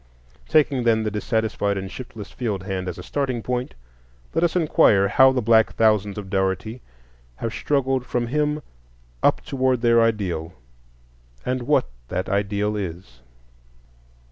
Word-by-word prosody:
Taking, 150 -4 +3
then, 110 -2 +3
the 110 - -2
dissatisfied 105 -2 -1
and 95 0 -5
shiftless 115 -5 -9
field 105 -7 -3
hand 95 -2 -4
as 90 +1 -4
a 90 - -8
starting 130 -3 -2
point, 125 - -3 0.6
let 165 - +1
us 170 0 +1
inquire 110 - +4
how 130 0 +6
the 125 -2 -1
black 110 0 +4
thousands 105 -3 +2
of 100 -2 -6
Dougherty 95 +5 -1 0.5
have 115 - -4
struggled 135 -3 0
from 120 -1 -2
him 150 +3 -1 0.6
up - - +3
toward 130 -2 0
their 115 -1 +4
ideal, 95 -7 -1 0.9
and 130 0 -1
what 150 - +3 0.2
that 95 - -3
ideal 100 +1 0
is. 85 -11 -6
110 Hz, 145 wpm, -23 LUFS, 100-130 Hz, 0.9 s, how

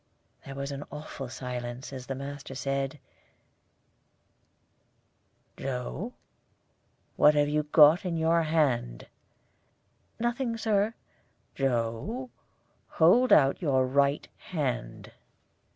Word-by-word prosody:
There 135 - -9
was 140 +1 -4 0.2
awful 145 -3 -7
silence 125 0 -6
as 130 -1 -8
the 135 - -3
master 140 0 -7
said, 135 +1 -2 2.6
"Joe, 135 - -4 1.0
what 150 0 +6
have 145 0 +3
you 150 +1 0 0.4
in 175 -3 -2
your 165 +1 +3
hand?" 140 - 0 1.1
"Nothing, 240 0 -1
Sir." 215 0 +1 0.6
"Joe, 135 - -2 0.6
hold 230 +11 +4
out 135 +2 +5
your 135 -6 +2
right 140 +2 +1
hand." 130 - -4
140 Hz, 90 wpm, -28 LUFS, 130-165 Hz, 2.6 s, what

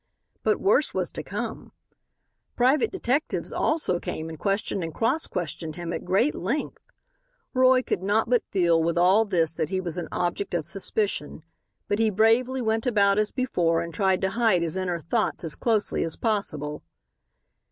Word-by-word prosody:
But - - +1
worse 405 +5 +2
was - - -1
to - - -5
come; - - -6 0.8
private 275 - +3
detectives 295 -6 -1
also 300 - 0
came 160 -1 -5
and 160 -2 -9
questioned 195 -2 -1
and 165 - -4
cross 230 - 0
questioned 160 -2 -4
him 175 -1 -5
at - - -4
great 195 +11 +2
length. 235 - -3 0.7
Roy 255 0 +5
could - - -2
not 205 +3 +1
but 245 0 +3
feel 170 -3 +3
with 170 +1 0
all 190 +6 +5
this 170 -6 +1
that 160 - -2
he 190 0 -1
was 175 -2 -5
an 175 - -3
object 175 +1 -2
of 160 -3 -1
suspicion, 190 -4 -2 0.4
but 205 - 0
he 225 -1 +3
bravely 230 +5 +2
went 225 +2 0
about 200 -3 +3
as 215 0 +1
before 175 -11 0
and 170 0 -6
tried 190 0 +1
to 190 0 0
hide 220 -6 +2
his 165 0 -2
inner 180 -2 -2
thoughts 205 +5 -1
as 160 -2 -1
closely 220 -3 0
as 165 - -2
possible. 150 - -2
195 Hz, 175 wpm, -25 LUFS, 170-230 Hz, 0.8 s, Roy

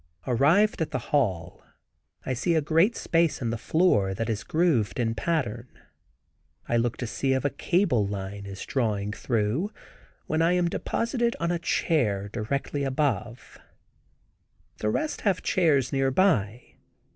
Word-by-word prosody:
Arrived 160 - +3
at 160 - 0
the 130 - -5
hall 95 - 0 0.6
I 130 - -1
see 165 +7 0
a - - +4
great 165 +9 +3
space 165 -2 +1
in 115 -3 -2
the - - -1
floor, 105 - +2
that 115 +2 -2
is 105 -1 -3
grooved 140 - +1
in 115 -2 +1
pattern. 125 -6 -2 1.0
I 120 - 0
look 120 0 0
to 125 - -4
see 135 +4 -1
if 130 +1 -1
a 145 - +1
cable 140 - +1
line 100 0 -6
is 95 -1 -7
drawing 105 -5 -1
through, 120 - -1 0.5
when 160 +1 0
I 170 +2 +3
am 180 -1 +2
deposited 235 +5 -1
on 170 +1 0
a 175 - -1
chair 105 -13 0
directly 135 +6 -3
above. 130 -4 -2 1.2
The 105 - 0
rest 305 - -2
have 195 -4 0
chairs 150 -8 +2
near 135 -1 +2
by. 125 - 0
130 Hz, 150 wpm, -26 LUFS, 110-165 Hz, 1.2 s, a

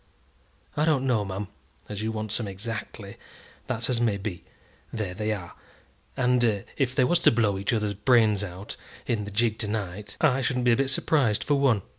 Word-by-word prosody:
"I 150 - +1
don't 150 -4 +2
know, 120 -5 +2
ma'am, 95 0 -4 0.4
as 105 0 -5
you 110 +1 -1
wants 110 0 -1
'em 110 - -3
exactly. 105 +1 -6 0.5
That's 115 -3 -1
as 120 -2 0
may 110 -4 +2
be. 95 -3 -5 0.5
There 105 -5 -3
they 105 +3 -2
are; 95 -5 -5 0.6
and 120 -5 +2
if 130 -2 0
they 130 - +4
was 175 +7 +3
to - - +6
blow 110 -4 +2
each 100 - 0
other's 105 -3 0
brains 105 -1 +3
out 95 +1 -7 0.3
in 105 -3 -1
the - - -6
gig 110 +1 +1
to 105 - -2
night, 100 -1 -4
I 135 -4 +3
shouldn't 125 0 0
be 120 - +5
a - - +5
bit 135 +2 +1
surprised 130 -5 +2
for 145 - +1
one. 135 -8 +3
110 Hz, 195 wpm, -26 LUFS, 100-125 Hz, 0.6 s, to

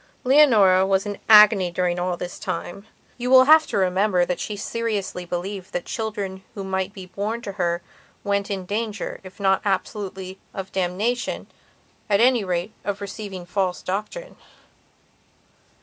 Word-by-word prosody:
Leonora 225 -9 +5
was 190 +1 +1
in 205 - -3
an - - -15
agony 210 -4 +7
during 175 0 -1
all 180 0 -1
this 180 0 -6
time. 175 +5 -5 0.3
You 245 +1 -2
will 260 0 +8
have 310 +3 +6
to - - -2
remember 185 -1 +2
she 210 - -5
seriously 205 -4 -3
believed 185 +3 -5
that 175 - -3
children 205 -4 -4
who 200 - -5
might 190 0 -2
be 190 -2 -10
born 210 +5 -4
to 200 - -4
her 175 -3 -1 0.4
went 200 0 -1
in 195 -2 -3
danger, 215 +2 -3
if 185 +1 -13
not 190 -1 +2
absolutely 190 -2 -3 0.2
of 195 -2 -6
damnation, 195 +7 -1 0.6
at 200 -1 +3
any 245 -1 +4
rate 180 +2 -2
of 200 -1 -3
receiving 200 -2 -7
false 180 0 -2
doctrine. 215 - -5
195 Hz, 150 wpm, -23 LUFS, 185-215 Hz, 0.6 s, will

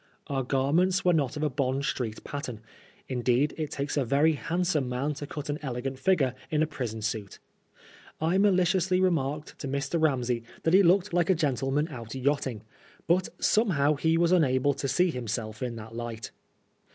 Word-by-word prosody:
Our 135 -2 -1
garments 150 +9 +1
were 180 - +5
not 145 -4 0
of 150 - -2
a 150 - +2
Bond 135 0 -1
Street 115 -6 -3
pattern; 125 -6 -6 0.5
indeed, 130 +3 +1
it 155 -2 -3
takes 140 +1 -3
a 140 - +3
very 140 +6 +3
handsome 165 -3 -1
man 135 +4 -1
to 145 0 -7
cut 150 -1 -6
an 145 +1 -2
elegant 130 -1 -4
figure 140 -6 +2 0.2
in 155 0 +2
a - - +3
prison 120 -8 -5
suit. 105 -3 -3 0.8
I 160 +3 +1
mall 200 -1 +5
ciously 185 0 +2
remarked 155 -5 -1
to 140 - -5
Mr. 140 +4 -1
Ramsey 125 -6 +1 0.2
Uiat 165 - +2
he 190 - +8
looked 190 +1 +3
like 175 0 +2
a 190 - +5
gentleman 140 -1 0
out 115 -4 -8
yachting; 130 -4 -1 0.4
but 180 +2 +2
somehow 160 -10 +3
he 160 +3 +1
was 170 0 +3
unable 145 -5 +3
to 135 0 -3
see 175 +7 +2
himself 110 -3 -4
in 125 -2 -3
that 110 0 -9
light. 115 -2 -5
140 Hz, 180 wpm, -28 LUFS, 125-165 Hz, 0.8 s, he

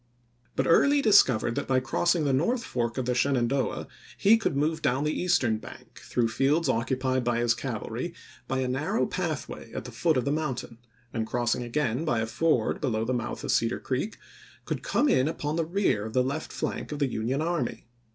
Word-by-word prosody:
But 135 - +1
Early 280 - +5
discovered 130 - +4
that - - -3
by 130 -1 +3
crossing 170 +5 +1
the 140 - +2
north 230 - +1
fork 120 - -2
of 130 - -1
the 125 - +1
Shenandoah 130 0 0 0.3
he 210 +3 +6
could 225 -11 -1
move 155 +3 0
down 130 +3 +1
the 150 +1 0
eastern 120 -11 +1
bank, - - -12
through 120 -2 0
fields 145 +8 +2
occupied 130 +2 0
by 120 0 +1
his 120 0 +3
cav 120 -3 -4
alry, 130 +10 -4 0.3
by 130 0 -1
a 130 - 0
narrow 150 - 0
pathway - - -4
at - - -5
the - - -7
foot 160 -4 +1
of 125 - 0
the 140 - +1
moun 150 -3 -1
tain, 115 -1 -9 0.3
and 110 -2 -2
crossing 120 0 0
again 120 +2 -1
by 120 -8 +1
a 110 - 0
ford 140 +9 +1
below 115 -5 0
the 130 - -1
mouth 120 -1 -3
of - - -1
Cedar 115 - +1
Creek, 135 +12 -3 0.5
could - - -3
come 295 - +1
in 130 - +3
upon 150 -1 -2
the 165 -1 0
rear 175 - +1
of 110 - -9
the 130 - +3
left 140 +5 -3
flank - - -4
of 150 - -3
the 145 - +2
Union 125 +2 -1
army. 170 -7 -2
130 Hz, 210 wpm, -27 LUFS, 120-155 Hz, 0.5 s, he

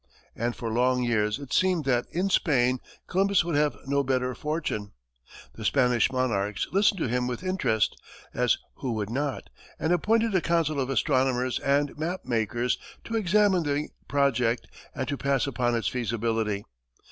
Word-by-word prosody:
And 120 +1 -2
for 115 -2 -4
long 125 +1 +2
years 105 -3 +1
it 140 -2 -8
seemed 185 -5 +2
that, 125 -2 +1
in 190 +3 -1
Spain, 130 -7 +2 0.3
Columbus 195 -1 +2
would 170 - -2
have 145 -5 +2
no 140 +1 +1
better 130 -1 0
fortune. 135 -7 -3 0.6
The 110 - -9
Spanish 125 -1 +3
monarchs 105 -6 0
listened 200 0 +3
to - - +1
him 125 +1 0
with 125 +7 -4
interest 185 - 0 0.3
as - - +2 0.2
who 125 -3 -3
would 105 -1 -3
not? 140 +2 -3 0.3
and 160 - +1
appointed 225 +5 +2
a 185 - +3
council 165 -4 +1
of 130 -1 -1
astronomers 130 -2 +1
and 140 +1 +1
map 175 +4 -3
makers 120 +1 0 0.2
to 230 - -4
examine 205 -2 +3
the 145 -1 -1 0.2
project 125 -4 +1 0.3
and 130 -2 -3
to 140 - -2
pass 140 -1 +1
upon 125 -3 0
its 115 -5 -1
feasibility. 115 -3 -1
130 Hz, 160 wpm, -27 LUFS, 120-160 Hz, 0.6 s, Spanish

